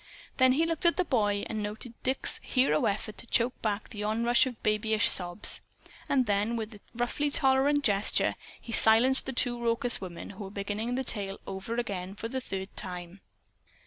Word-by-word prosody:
Then 260 Hz, -1 st, +5 dB
he 320 Hz, +5 st, +2 dB
looked 330 Hz, +1 st, +1 dB
at 340 Hz, -, +3 dB
the 365 Hz, -, +1 dB
boy, 205 Hz, -7 st, +1 dB
and 215 Hz, -1 st, -4 dB
noted 215 Hz, +3 st, -6 dB
Dick's 260 Hz, +1 st, 0 dB
hero 255 Hz, -, +1 dB
effort 210 Hz, +1 st, -2 dB
to 235 Hz, -, -10 dB
choke 240 Hz, +2 st, +1 dB
back 210 Hz, -1 st, -2 dB
the 210 Hz, -3 st, -6 dB
onrush 235 Hz, +4 st, +2 dB
of 245 Hz, -3 st, -8 dB
babyish 215 Hz, 0 st, +2 dB
sobs. 175 Hz, +2 st, +2 dB, 0.5 s
And 260 Hz, -2 st, +2 dB
then, 210 Hz, +2 st, 0 dB
with 225 Hz, 0 st, -5 dB
a 205 Hz, -, -13 dB, 0.2 s
roughly 245 Hz, +5 st, -1 dB
tolerant 280 Hz, +1 st, +3 dB
gesture, 205 Hz, -3 st, +2 dB, 0.3 s
he 230 Hz, -, -10 dB
silenced 230 Hz, +5 st, +6 dB
the -, -, -1 dB
two 240 Hz, -1 st, -1 dB
raucous 235 Hz, 0 st, +1 dB
women, 180 Hz, -1 st, -7 dB
who 200 Hz, +1 st, -8 dB
were -, -, -8 dB
beginning 205 Hz, +4 st, -3 dB
the 265 Hz, -, -1 dB
tale 200 Hz, -5 st, -3 dB
over 195 Hz, +4 st, -5 dB
again 195 Hz, -5 st, -4 dB
for 225 Hz, -, -5 dB
the 260 Hz, +2 st, -4 dB
third 195 Hz, -4 st, -6 dB
time. 180 Hz, +1 st, -5 dB
220 Hz, 185 wpm, -29 LUFS, 200-255 Hz, 0.5 s, silenced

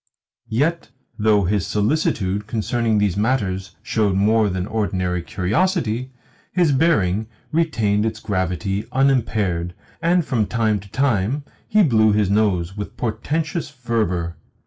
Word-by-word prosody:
Yet, 145 Hz, +5 st, 0 dB, 0.3 s
though 105 Hz, -1 st, +4 dB
his 100 Hz, +1 st, 0 dB
solicitude 105 Hz, -4 st, 0 dB
concerning 115 Hz, 0 st, 0 dB
these 105 Hz, -3 st, +1 dB
matters 100 Hz, -5 st, -1 dB
showed 105 Hz, -4 st, +1 dB
more 105 Hz, +2 st, +3 dB
than 95 Hz, -1 st, -2 dB
ordinary 90 Hz, -5 st, -1 dB
curiosity, 125 Hz, -, 0 dB, 0.4 s
his 175 Hz, -5 st, +3 dB
bearing 110 Hz, -, +2 dB, 0.2 s
retained 110 Hz, -11 st, +1 dB
its 110 Hz, 0 st, -2 dB
gravity 95 Hz, +1 st, -2 dB
unimpaired, 105 Hz, -10 st, +1 dB, 0.3 s
and 170 Hz, 0 st, +2 dB
from 115 Hz, -8 st, 0 dB
time 110 Hz, -3 st, +1 dB
to 100 Hz, +1 st, -14 dB
time 130 Hz, +2 st, 0 dB, 0.2 s
he 215 Hz, 0 st, +4 dB
blew 110 Hz, -, +4 dB
his 105 Hz, -2 st, +2 dB
nose 95 Hz, -4 st, +1 dB
with 105 Hz, -1 st, -6 dB
portentous 150 Hz, -, -2 dB
fervour. 105 Hz, -9 st, -2 dB
110 Hz, 125 wpm, -21 LUFS, 95-130 Hz, 0.4 s, though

